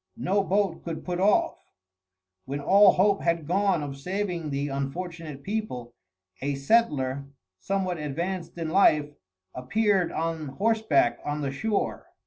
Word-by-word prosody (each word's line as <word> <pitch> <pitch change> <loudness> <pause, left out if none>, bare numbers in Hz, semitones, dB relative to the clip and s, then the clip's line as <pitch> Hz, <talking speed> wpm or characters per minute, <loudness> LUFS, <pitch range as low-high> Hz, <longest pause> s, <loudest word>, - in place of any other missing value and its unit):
No 200 -3 +1
boat 195 -3 0
could 165 -2 -6
put 180 -1 -2
off. 325 - +2 0.9
When 140 +2 -4
all 195 +8 +6
hope 200 +2 +3
had 170 -2 0
gone 190 -1 +1
of 140 -1 -6
saving 180 -1 -3
the 140 0 -2
unfortunate 150 +1 -5
people, 195 - -4 0.5
a 140 +1 -1
settler, 140 - +1 0.3
somewhat 185 - -2
advanced 170 +5 -4
in 165 -2 -3
life, 150 -6 +4 0.4
appeared 190 - +1
on 160 -1 -2
horseback 220 - +1
on 145 +1 -3
the 140 -2 -2
shore. 210 +9 -2
170 Hz, 130 wpm, -26 LUFS, 145-200 Hz, 0.9 s, all